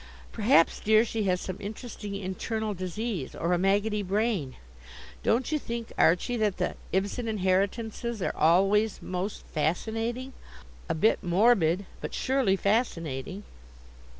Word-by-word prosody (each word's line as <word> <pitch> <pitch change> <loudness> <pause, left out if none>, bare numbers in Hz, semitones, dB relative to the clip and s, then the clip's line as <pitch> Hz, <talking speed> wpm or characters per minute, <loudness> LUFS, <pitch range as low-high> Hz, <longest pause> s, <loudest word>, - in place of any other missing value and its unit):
Perhaps, 215 -6 +3
dear, 220 +1 +4
she 220 -2 -2
has 180 -1 +1
some 185 0 -5
interesting 210 0 -6
internal 210 +3 -3
disease, 185 - -4
or 170 +2 0
a 175 - +2
maggoty 205 +3 +2
brain. 195 - -1 0.7
Don't 245 +6 +1
you 305 - +1
think, 235 -3 -5
Archie, 180 +9 +3
that 210 -4 +1
the - - -1 0.2
Ibsen 200 +5 -1
inheritances 215 +3 -1
are 180 - -2
always 195 +6 +3
most 185 +3 -4
fascinating? 225 - -1 0.6
A - - +1
bit 210 +8 +3
morbid, 185 -1 +3 0.2
but - - -5
surely 260 -7 +2
fascinating." 190 - -1
205 Hz, 125 wpm, -28 LUFS, 185-225 Hz, 0.7 s, dear